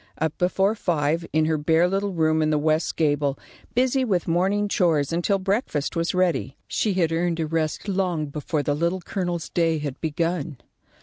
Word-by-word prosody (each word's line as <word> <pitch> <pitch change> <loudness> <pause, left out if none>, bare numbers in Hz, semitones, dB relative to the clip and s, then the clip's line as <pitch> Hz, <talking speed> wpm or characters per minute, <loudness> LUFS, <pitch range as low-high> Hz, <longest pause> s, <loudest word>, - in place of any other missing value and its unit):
Up 160 -1 -1
before 190 +3 +2
five, 165 -5 0
in 155 0 +2
her 155 -1 +1
bare 160 +3 +3
little 195 +2 -1
room 160 -2 +2
in 155 - +2
the 155 - +2
west 155 +1 +1
gable, 145 -3 +1 0.4
busy 260 +1 +2
with 190 -8 0
morning 190 +5 +1
chores 165 -7 +1
until 175 +4 +1
breakfast 190 - -1
was 170 +2 0
ready, 170 -7 0
she 210 - 0
had 170 -3 +2
earned 170 0 0
a 160 - 0
rest 155 +3 -2
long 185 -5 0
before 150 +1 -3
the 145 - 0
Little 170 +5 -1
Colonel's 175 -3 -3
day 165 -2 +1
had 145 -3 -5
begun. 165 -1 -2
165 Hz, 180 wpm, -24 LUFS, 155-185 Hz, 0.4 s, bare